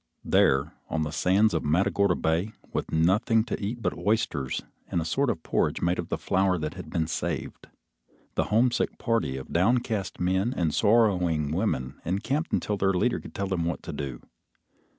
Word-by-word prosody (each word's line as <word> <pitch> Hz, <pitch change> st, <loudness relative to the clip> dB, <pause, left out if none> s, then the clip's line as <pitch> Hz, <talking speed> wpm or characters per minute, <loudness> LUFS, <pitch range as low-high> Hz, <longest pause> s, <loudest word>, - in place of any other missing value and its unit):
There, 70 Hz, +1 st, +3 dB, 0.2 s
on 80 Hz, -, 0 dB
the 75 Hz, -, -3 dB
sands 95 Hz, +7 st, +3 dB
of -, -, 0 dB
Matagorda 90 Hz, +4 st, +2 dB
Bay, 85 Hz, +7 st, 0 dB, 0.2 s
with -, -, -2 dB
nothing 105 Hz, +8 st, +3 dB
to 110 Hz, -3 st, -4 dB
eat 115 Hz, +3 st, -3 dB
but -, -, 0 dB
oysters 105 Hz, -, -1 dB, 0.2 s
and -, -, -1 dB
a 80 Hz, -, -2 dB
sort 135 Hz, -, +1 dB
of 80 Hz, -, -2 dB
porridge -, -, 0 dB
made 85 Hz, +1 st, 0 dB
of -, -, -4 dB
the -, -, -1 dB
flour 95 Hz, -1 st, +1 dB
that 75 Hz, -2 st, -3 dB
had -, -, -9 dB
been 80 Hz, -, 0 dB
saved, 80 Hz, -, -4 dB, 0.7 s
the -, -, +1 dB
homesick 120 Hz, +3 st, +1 dB
party 115 Hz, -, 0 dB
of 65 Hz, -, -8 dB
downcast 105 Hz, +1 st, +1 dB
men 95 Hz, +6 st, +1 dB
and 80 Hz, -4 st, +1 dB
sorrowing 90 Hz, -9 st, +3 dB
women 75 Hz, -8 st, -2 dB
encamped 125 Hz, -, -1 dB
until 105 Hz, -, 0 dB
their 95 Hz, 0 st, +2 dB
leader 90 Hz, -, +1 dB
could -, -, -12 dB
tell 100 Hz, -, -1 dB
them 95 Hz, -3 st, -1 dB
what 85 Hz, -1 st, -3 dB
to -, -, -6 dB
do. 65 Hz, -4 st, -5 dB
95 Hz, 180 wpm, -27 LUFS, 80-110 Hz, 0.7 s, There